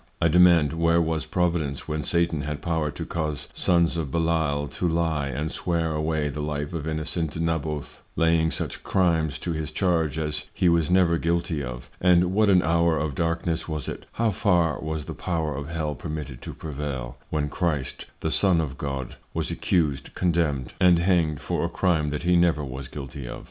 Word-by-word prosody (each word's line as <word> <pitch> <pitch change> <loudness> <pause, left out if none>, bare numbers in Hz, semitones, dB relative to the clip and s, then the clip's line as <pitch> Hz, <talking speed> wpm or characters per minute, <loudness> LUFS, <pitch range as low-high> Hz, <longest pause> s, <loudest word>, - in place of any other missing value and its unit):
I 85 - +3
demand, 85 -3 +5
where 85 0 +3
was 80 -1 -1
Providence, 85 -5 -1
when 75 -1 -2
Satan 85 0 +1
had 75 0 -4
Power 80 -3 0
to - - -6
cause 75 -3 -3
Sons 85 -1 +2
of 80 -4 -2
Belial 80 -2 +1
to 90 - -2
lye 80 -3 0
and 75 +4 -3
swear 85 -2 -1
away 75 0 0
the 75 +1 -4
Life 75 0 -3
of 80 -2 -4
innocent 80 0 -2
Naboth, 80 -3 -2
laying 80 0 +3
such - - -3
Crimes 80 -6 +1
to 85 - -3
his 80 -1 -3
charge 80 -4 +1
as 75 -1 -1
he 90 - +2
was 85 -2 +2
never 90 -2 +4
guilty 85 -2 0
of? 60 -1 -7
And 90 0 +4
what 105 +1 +4
an 90 -2 +5
Hour 85 0 +3
of 75 -1 -1
Darkness 85 +2 -1
was 75 -4 -4
it? - - -6
How 115 -1 +1
far 90 -5 +2
was 80 -1 -4
the - - -5
Power 80 -5 -2
of 70 +1 -5
Hell 80 -2 -2
permitted 75 -5 -6
to - - -7
prevail, 70 -4 -5
when 75 -1 0
Christ 75 -4 -2
the 80 - -1
Son 95 -2 +3
of 70 -4 -3
God 70 -3 -4 0.2
was - - -1
accused, 75 -6 0
condemned, 80 -7 0
and 90 -2 +6
hanged 85 -4 +2
for - - -1
a - - 0
Crime 80 -5 +1
that 75 +3 -3
he 90 +1 +3
never 85 -3 +3
was 65 +1 -6
guilty 70 -2 -7
of? - - -6
80 Hz, 190 wpm, -25 LUFS, 75-85 Hz, 0.2 s, and